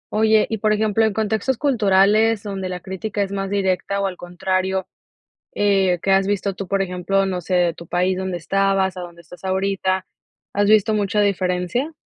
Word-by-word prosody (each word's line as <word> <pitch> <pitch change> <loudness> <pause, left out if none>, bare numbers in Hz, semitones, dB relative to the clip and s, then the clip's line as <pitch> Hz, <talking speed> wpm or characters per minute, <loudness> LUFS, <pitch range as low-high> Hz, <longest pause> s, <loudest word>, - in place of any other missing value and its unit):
Oye, 220 0 +4
y 220 -2 -3
por 215 0 +2
ejemplo, 215 +1 +1
en 220 - +1
contextos 220 +4 -1
culturales 215 -4 +3
donde 195 -3 -4
la 180 0 -5
crítica 200 +2 -3
es 195 - -5
más 195 -1 -3
directa, 200 0 -1
o 200 - 0
al 190 -2 -3
contrario, 185 +2 -2 0.7
eh, 195 -3 +2
que 195 - -2
has 195 0 +4
visto 200 -1 -1
tú, 195 0 -6
por 195 +1 0
ejemplo, 195 +1 0
no 180 -2 -3
sé 185 - -4
de 175 -2 +3
tu 170 - -11
país 180 +2 0
donde 185 -1 -3
estabas 195 +1 0
a - - -4
donde 170 -1 -10
estás 180 +3 -15
ahorita, 190 0 -1 0.5
¿has 205 0 +1
visto 215 +1 +4
mucha 205 0 +1
diferencia? 190 - -1
195 Hz, 190 wpm, -21 LUFS, 185-205 Hz, 0.7 s, Oye